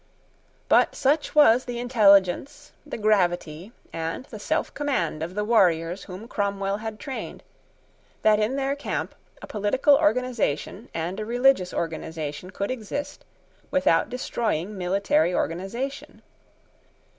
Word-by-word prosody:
But - - +4
such 295 +4 +1
was 255 -4 +6
the 245 -1 -5
intelligence, 230 +3 +3 0.2
the - - -5
gravity, 180 -4 0 0.2
and 165 +9 -4
the 220 -6 -10
selfcommand 285 - -1
of 170 +3 -5
the 210 - 0
warriors 180 -5 +2
whom 195 +4 -9
Cromwell 200 -2 -1
had 215 0 -6
trained, 270 -3 -7 0.8
that 215 -1 +5
in 215 +5 0
their 275 0 -1
camp 285 - -4 0.3
a - - -4
political 220 +8 +2
organisation 250 - 0
and 170 +4 -4
a - - -2
religious 245 -6 +3
organisation 160 0 -4
could 200 +4 -3
exist 255 +4 -5 0.4
without 220 -12 +2
destroying 215 -6 -2
military 195 - +1
organisation. 215 - -4
210 Hz, 120 wpm, -25 LUFS, 180-255 Hz, 0.8 s, was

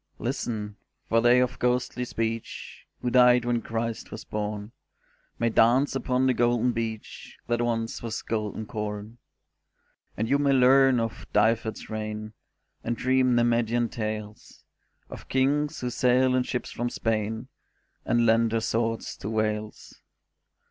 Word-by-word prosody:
Listen, 110 -4 -3 0.3
for 115 0 +3
they 120 +1 +5
of 125 0 0
ghostly 125 0 0
speech, 115 -1 -5 0.2
Who 125 - 0
died 125 -1 +5
when 120 -1 0
Christ 115 0 -4
was 110 - -8
born, 105 0 -4 0.7
May 115 - +1
dance 125 +5 +3
upon 130 0 +1
the 130 - +3
golden 120 0 +2
beach 115 -2 -6
That 120 0 0
once 115 -1 -1
was 115 -1 -4
golden 110 -1 -3
corn. 105 +2 -5 1.0
And 110 - -1
you 140 +4 +2
may 140 -1 +3
learn 130 0 +5
of 115 -1 -4
Dyfed's 110 +1 +1
reign, 110 0 -5 0.5
And 120 0 -2
dream 130 -1 +2
Nemedian 120 0 +2
tales 110 -2 -6 0.4
Of - - -11
Kings 145 +3 +1
who 125 -1 -2
sailed 125 +2 +3
in 130 - +3
ships 125 0 -3
from 120 0 -2
Spain 110 +2 -2 0.5
And 120 0 +2
lent 115 0 +4
their 115 - +1
swords 115 -1 -1
to 100 - -5
Wales. 110 -1 -3
115 Hz, 140 wpm, -26 LUFS, 110-125 Hz, 1.0 s, they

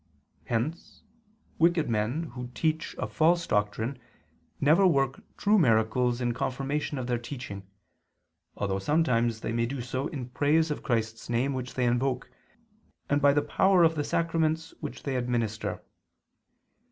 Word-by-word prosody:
Hence 125 +9 -3 0.6
wicked 170 -1 +3
men 115 +8 0
who 125 -1 -6
teach 160 0 -1
a - - -2
false 170 +2 +2
doctrine 110 +4 -1 0.6
never 165 +7 +5
work 135 -5 +1 0.2
true 210 +1 +4
miracles 120 -2 +2
in 120 -1 0
confirmation 135 +4 -2
of 130 - -3
their 120 -1 -1
teaching, 115 -6 -7 0.9
although 100 -1 -1
sometimes 120 -4 +1
they - - -3
may 115 0 0
do 135 +2 -4
so 130 +3 -3
in 125 -4 -6
praise 150 +4 +2
of 150 - -3
Christ's 115 -2 -2
name 125 +4 +1
which 125 -1 -5
they 125 - +1
invoke, 125 +2 0 0.8
and 145 0 +3
by 140 0 +6
the 145 +1 +2
power 190 +4 +4
of 165 -1 +5
the 150 -2 -1
sacraments 160 0 0
which - - -7
they 135 -2 -2
administer. 120 -3 -2
130 Hz, 145 wpm, -28 LUFS, 120-155 Hz, 0.9 s, by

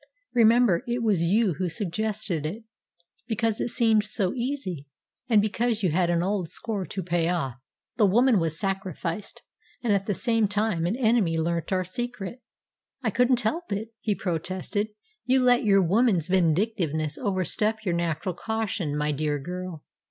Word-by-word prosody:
Remember, 230 -4 +4
it 240 0 -1
was 205 -7 +2
you 195 +3 +3
who 185 -2 0
suggested 200 -1 -2
it, 195 +9 -5 0.6
because 225 -1 0
it - - -1
seemed 225 -3 +3
so 210 -3 -1
easy, 235 - -3 0.4
and 215 -3 +5
because 225 0 0
you 180 - +2
had 175 +2 +2
an 170 0 +2
old 190 -3 -1
score 210 -2 -4
to 190 - -4
pay 170 -1 0
off." 135 -8 -1 0.4
"The 210 - +5
woman 235 +2 +4
was 160 -1 -2
sacrificed, 190 -1 -3 0.4
and 225 -4 +2
at 195 -1 0
the 205 - 0
same 225 0 +2
time 205 -4 0
an 195 - 0
enemy 220 -9 +2
learnt 170 +2 -1
our 185 -1 +1
secret." 240 +3 -5 0.6
"I 220 - +1
couldn't 245 +2 +3
help 325 +9 -2
it," 220 +3 -3
he 210 -2 0
protested. 185 +4 -2 0.4
"You 260 +1 +3
let 245 +1 +4
your 195 -3 +4
woman's 190 -2 +2
vindictiveness 165 -4 +1
overstep 210 +1 0
your 180 - +1
natural 170 +2 -1
caution, 195 -7 -2
my 150 0 0
dear 150 0 -1
girl. 180 +1 -6
195 Hz, 160 wpm, -26 LUFS, 170-225 Hz, 0.6 s, and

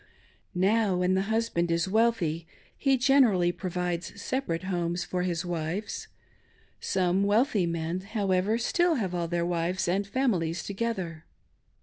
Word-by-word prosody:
Now, 200 +2 +2
when 180 +1 +2
the 190 - +2
husband 220 -6 0
is 170 +2 +1
wealthy 190 -7 +1 0.3
he 270 -1 +2
generally 240 -10 +4
provides 175 +1 -3
separate 200 -8 -2
homes 175 -2 -1
for 180 - -2
his 180 -1 -1
wives. 175 +4 -3 0.7
Some 185 0 +1
wealthy 205 -2 +2
men, 165 +1 -2
however, 200 0 0
still 345 +8 +2
have 195 -9 -2
all 170 -1 -1
their 170 0 -1
wives 175 +2 -1
and 195 +3 0
families 185 -9 0
together. 190 -6 -3
185 Hz, 130 wpm, -28 LUFS, 170-215 Hz, 0.7 s, generally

